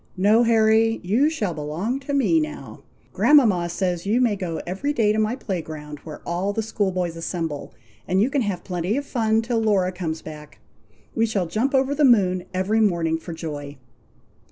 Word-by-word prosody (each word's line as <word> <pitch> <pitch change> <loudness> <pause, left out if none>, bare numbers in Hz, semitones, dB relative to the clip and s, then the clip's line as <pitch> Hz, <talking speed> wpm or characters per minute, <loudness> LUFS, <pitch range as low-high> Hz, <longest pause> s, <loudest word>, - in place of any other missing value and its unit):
"No, 210 +5 +4
Harry! 225 -1 +3
you 230 +12 +2
shall 210 - -2
belong 160 - -3
to 280 +1 -5
me 300 +4 +3
now. 305 -1 -6 0.3
Grandmama 215 -13 +4
says 175 -1 -2
you 225 +4 +2
may 240 -5 +2
go 180 -4 -4
every 195 +12 -2
day 215 -5 +2
to 215 - 0
my 215 +2 +1
play 190 -9 -4
ground, 150 -2 -8
where 150 0 -10
all 180 +4 -1
the 225 - -2
school 205 -3 -1
boys 180 -2 -2
assemble, 165 -3 -4 0.4
and 185 +1 +1
you 230 +7 +2
can 280 - +1
have 200 -6 -3
plenty 180 +5 -2
of 285 - -3
fun 225 -4 +1
till 230 0 0
Laura 200 -4 +2
comes 165 -3 -4
back. 150 -1 -10 0.6
We 225 0 +1
shall 200 -5 -1
jump 230 +11 -1
over 270 +1 +2
the 295 +1 +1
moon 185 -8 +4
every 190 +4 0
morning, 170 -6 +1
for 170 - -8
joy." 150 -3 -6
200 Hz, 190 wpm, -23 LUFS, 170-230 Hz, 0.6 s, No